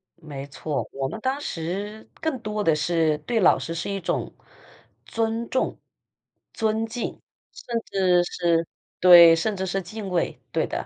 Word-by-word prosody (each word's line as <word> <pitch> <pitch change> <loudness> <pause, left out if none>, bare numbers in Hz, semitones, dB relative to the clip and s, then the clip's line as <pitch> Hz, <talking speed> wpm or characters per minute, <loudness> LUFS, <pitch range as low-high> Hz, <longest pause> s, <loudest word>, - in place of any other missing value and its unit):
没 145 -5 -8
错， 145 +1 -4
我 135 0 -3
们 220 - -6
当 265 +3 -1
时 200 - -5
更 320 -4 -1
多 215 -2 -3
的 160 -5 +3
是 155 0 +1
对 225 +10 -1
老 190 - +5
师 165 - -5
是 165 +3 -4
一 195 -1 -3
种 170 - -2 0.7
尊 225 +1 -2
重、 260 - -1 0.7
尊 220 0 0
敬， 230 +1 -5 0.3
甚 240 - -4
至 185 -2 +3
是 170 -2 0 0.3
对， 175 -2 +9
甚 205 +6 -1
至 190 0 -3
是 195 +1 -2
敬 200 +2 -7
畏， 180 -2 -1
对 - - 0
的， - - -4
190 Hz, 170 characters per minute, -24 LUFS, 165-220 Hz, 0.7 s, 对